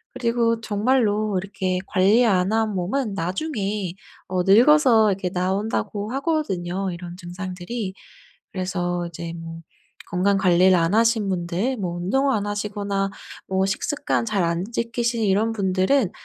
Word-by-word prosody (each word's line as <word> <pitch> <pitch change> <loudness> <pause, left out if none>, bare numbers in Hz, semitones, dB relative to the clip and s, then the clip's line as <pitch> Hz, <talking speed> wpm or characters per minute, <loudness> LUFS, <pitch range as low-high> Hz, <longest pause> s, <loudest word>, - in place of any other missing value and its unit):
그리고 235 -2 +1
정말로 215 -2 +1
이렇게 190 -2 -2
관리 205 +6 +4
안 190 -3 +2
한 220 -1 +1
몸은 200 +5 -1
나중에 195 - -2 0.4
어 185 0 0
늙어서 230 - +6
이렇게 185 -1 -2
나온다고 200 +3 -2
하거든요 195 - -1
이런 175 0 -8
증상들이. 185 +3 -5 0.6
그래서 175 -2 -2
이제 170 0 -7
뭐 165 0 -8 0.5
건강 195 +3 +2
관리를 185 0 +4
안 165 +3 +1
하신 225 -2 +3
분들 185 +7 -1
뭐 180 -5 -3
운동을 270 +10 +1
안 205 -1 -1
하시거나 205 -1 -2 0.4
뭐 190 0 +1
식습관 260 +6 -1
잘 210 -4 0
안 170 +1 -1
지키시는 235 -1 -1
이런 210 +4 +2
분들은 195 +2 +1
195 Hz, 290 characters per minute, -23 LUFS, 180-225 Hz, 0.6 s, 늙어서